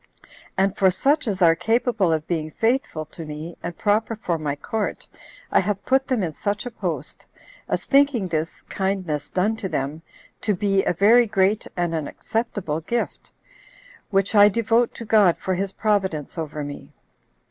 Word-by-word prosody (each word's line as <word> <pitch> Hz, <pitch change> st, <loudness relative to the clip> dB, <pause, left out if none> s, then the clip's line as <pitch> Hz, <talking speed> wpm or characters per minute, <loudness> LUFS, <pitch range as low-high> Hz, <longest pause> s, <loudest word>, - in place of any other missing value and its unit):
And 195 Hz, 0 st, +2 dB
for 190 Hz, -, +4 dB
such 275 Hz, -, +1 dB
as 195 Hz, -3 st, 0 dB
are 165 Hz, -1 st, +6 dB
capable 225 Hz, -3 st, +1 dB
of 155 Hz, -1 st, 0 dB
being 160 Hz, -3 st, -2 dB
faithful 225 Hz, -, 0 dB
to 165 Hz, -, -7 dB
me, 155 Hz, +2 st, -7 dB
and 170 Hz, 0 st, -6 dB
proper 220 Hz, +2 st, +1 dB
for 175 Hz, -6 st, -2 dB
my 145 Hz, -2 st, -2 dB
court, 220 Hz, +8 st, -3 dB, 0.4 s
I -, -, +5 dB
have 205 Hz, -2 st, -2 dB
put 265 Hz, +1 st, +2 dB
them 250 Hz, -7 st, 0 dB
in 165 Hz, -3 st, -2 dB
such 205 Hz, +7 st, -2 dB
a 245 Hz, -, -5 dB
post, 170 Hz, -, -5 dB, 0.4 s
as -, -, -1 dB
thinking 275 Hz, -8 st, +3 dB
this 160 Hz, -1 st, -3 dB
[kindness 190 Hz, -6 st, -2 dB
done 200 Hz, +4 st, +1 dB
to 195 Hz, -4 st, -4 dB
them] 145 Hz, +2 st, -3 dB, 0.4 s
to 210 Hz, -1 st, +1 dB
be 195 Hz, 0 st, +1 dB
a -, -, +2 dB
very 225 Hz, +7 st, +5 dB
great 205 Hz, 0 st, +1 dB
and 175 Hz, -1 st, 0 dB
an 155 Hz, -3 st, -2 dB
acceptable 205 Hz, -9 st, -3 dB
gift, 235 Hz, +9 st, -3 dB, 0.8 s
which 195 Hz, 0 st, +1 dB
I 205 Hz, -1 st, +8 dB
devote 230 Hz, +2 st, +2 dB
to 230 Hz, -, -7 dB
God 210 Hz, -5 st, +4 dB
for 190 Hz, -, -2 dB
his 190 Hz, +1 st, -2 dB
providence 190 Hz, -9 st, -1 dB
over 155 Hz, -3 st, -4 dB
me. 145 Hz, 0 st, -8 dB
195 Hz, 170 wpm, -23 LUFS, 165-220 Hz, 0.8 s, I